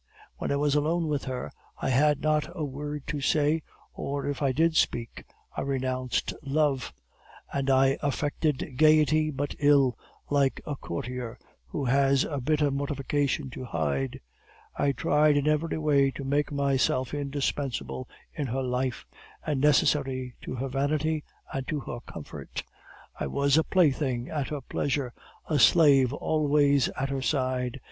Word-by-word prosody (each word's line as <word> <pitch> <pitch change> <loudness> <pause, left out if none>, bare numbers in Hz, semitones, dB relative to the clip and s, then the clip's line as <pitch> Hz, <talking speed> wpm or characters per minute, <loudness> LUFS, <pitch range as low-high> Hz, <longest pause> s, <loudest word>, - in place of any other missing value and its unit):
When - - -3
I - - +2
was 145 0 +1
alone 160 +3 +1
with 145 -2 -1
her, 130 -2 -4 0.3
I - - -1
had 145 +3 +3
not 155 0 +1
a 160 -4 -2
word 145 +1 -5
to 145 - -3
say, 150 +3 +2 0.3
or 140 0 -3
if 145 0 -3
I 140 -2 +2
did 160 +4 +2
speak, 115 -6 0 0.3
I - - -2
renounced 130 -2 -1
love; 140 -2 0 0.6
and 135 -1 -1
I 135 0 +4
affected 145 -1 -1
gaiety 155 0 +4
but 145 0 -3
ill, 140 -4 +4 0.3
like 140 -2 +2
a 145 - -3
courtier 120 +3 -5 0.3
who 135 - -3
has 135 +1 +3
a 145 -3 -3
bitter 150 +1 +2
mortification 140 -1 -1
to 130 - -7
hide. 70 - -2 0.6
I 140 - +2
tried 150 +3 +3
in 145 +1 +1
every 155 +2 +1
way 145 -3 +3
to 140 - -7
make 145 +2 0
myself 135 -2 +1
indispensable 140 -2 -3 0.2
in 145 -4 -3
her 130 +2 -2
life, 125 0 -2 0.4
and 145 -4 0
necessary 135 -3 +2
to - - -5
her 130 +2 -3
vanity 150 +3 0 0.3
and 135 -1 -3
to 150 - -1
her 120 - -6
comfort; 80 - -7 0.6
I - - -1
was 140 0 +2
a 160 - +5
plaything 140 -9 +1
at 145 -4 -2
her 150 -2 -4
pleasure, 130 -1 -2 0.3
a 150 -2 0
slave 135 -1 +6
always 145 -2 +2
at 135 +1 -1
her 135 -1 -2
side. 130 -2 -1
140 Hz, 155 wpm, -27 LUFS, 130-150 Hz, 0.6 s, slave